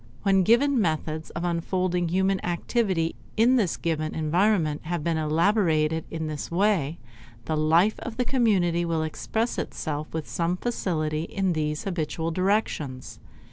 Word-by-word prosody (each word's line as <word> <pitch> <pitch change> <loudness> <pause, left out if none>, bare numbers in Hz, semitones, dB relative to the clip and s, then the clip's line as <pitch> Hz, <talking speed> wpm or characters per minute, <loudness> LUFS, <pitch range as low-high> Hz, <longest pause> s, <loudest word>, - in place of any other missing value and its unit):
When 195 -1 +4
given 240 +6 +4
methods 155 -2 -2
of 170 - -5
unfolding 175 +1 0
human 190 +2 +1
activity 175 -1 0 0.2
in 235 +4 +5
this 195 -8 +1
given 155 -2 -2
environment 160 0 +1
have 170 -1 -2
been 165 0 0
elaborated 160 -1 +2
in 160 -1 -4
this 150 -2 -4
way, 170 -4 +1 0.5
the 160 - -1
life 165 +7 +3
of 230 -2 -7
the 250 - +1
community 200 -9 +2
will 165 -2 0
express 220 +9 -2
itself 150 -1 -4
with 160 -1 -4
some 175 +1 -1
facility 160 -9 -2
in 190 -1 -1
these 150 -1 -2
habitual 165 -3 -2
directions. 165 -8 -1
170 Hz, 140 wpm, -26 LUFS, 155-195 Hz, 0.5 s, in